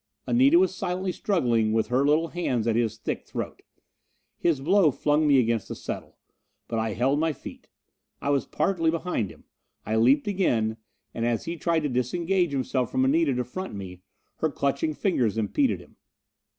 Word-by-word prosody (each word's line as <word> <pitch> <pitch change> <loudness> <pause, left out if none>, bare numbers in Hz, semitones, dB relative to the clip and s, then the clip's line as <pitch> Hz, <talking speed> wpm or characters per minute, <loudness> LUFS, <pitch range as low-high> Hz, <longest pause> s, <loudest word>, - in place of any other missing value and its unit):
Anita 270 +7 +5
was 375 +1 +3
silently 185 +1 -2
struggling 120 - +1
with 110 -1 +1
her 125 +2 +2
little 155 +3 +2
hands 130 -10 -1
at 115 -2 +1
his 115 -2 0
thick - - -4
throat. - - -6 0.8
His 165 -5 +2
blow 175 +4 +4
flung 150 +3 +1
me 140 -2 +5
against 115 -3 +1
a - - -4
settle. - - -7 0.5
But 115 - -2
I 110 -1 -1
held 135 +7 +1
my 160 0 +1
feet. - - -11 0.5
I 140 - -1
was 140 -2 +1
partly 165 -4 +1
behind 160 - -1
him. - - -15 0.4
I 110 +1 0
leaped 135 - +4
again, 115 - +1 0.4
and 115 - -3
as 120 -1 0
he 170 - -3
tried 165 -1 0
to 150 - -1
disengage 170 +8 0
himself 130 -2 -1
from 130 - +1
Anita 145 0 +2
to 125 - 0
front 185 - -6
me, 90 -2 -8 0.4
her 160 - 0
clutching 140 +2 -1
fingers 125 - 0
impeded 180 - +1
him. - - -17
140 Hz, 175 wpm, -26 LUFS, 115-170 Hz, 0.8 s, Anita